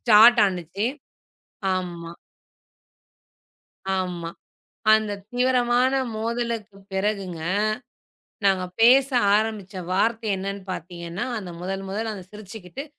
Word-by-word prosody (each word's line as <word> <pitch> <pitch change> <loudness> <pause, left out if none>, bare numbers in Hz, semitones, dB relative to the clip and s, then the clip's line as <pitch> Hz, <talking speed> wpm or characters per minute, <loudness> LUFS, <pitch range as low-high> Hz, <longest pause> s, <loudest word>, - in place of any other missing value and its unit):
ஸ்டார்டானுச்சு 210 -5 +5 0.9
ஆமா. 175 -2 -4 1.9
ஆமா. 175 -3 -3 0.6
அந்தத் 205 -2 +1
தீவிரமான 250 0 +3 0.2
மோதலுக்கு 230 -2 -3 0.2
பிறகுங்க, 190 -4 -1 1.0
நாங்க 190 -2 +3 0.2
பேச 260 +4 +7 0.3
ஆரம்பிச்ச 215 -3 -2 0.2
வார்த்தை 225 +3 +1
என்னன்னு 195 +1 -4
பாத்தீங்கன்னா, 170 0 -5
அந்த 190 -4 -7
முதல் 190 +2 -3
முதல் 220 +3 -2
அந்த 190 -3 -8
சிரிச்சுக்கிட்டு, 210 - -8
200 Hz, 85 wpm, -24 LUFS, 185-225 Hz, 1.9 s, பேச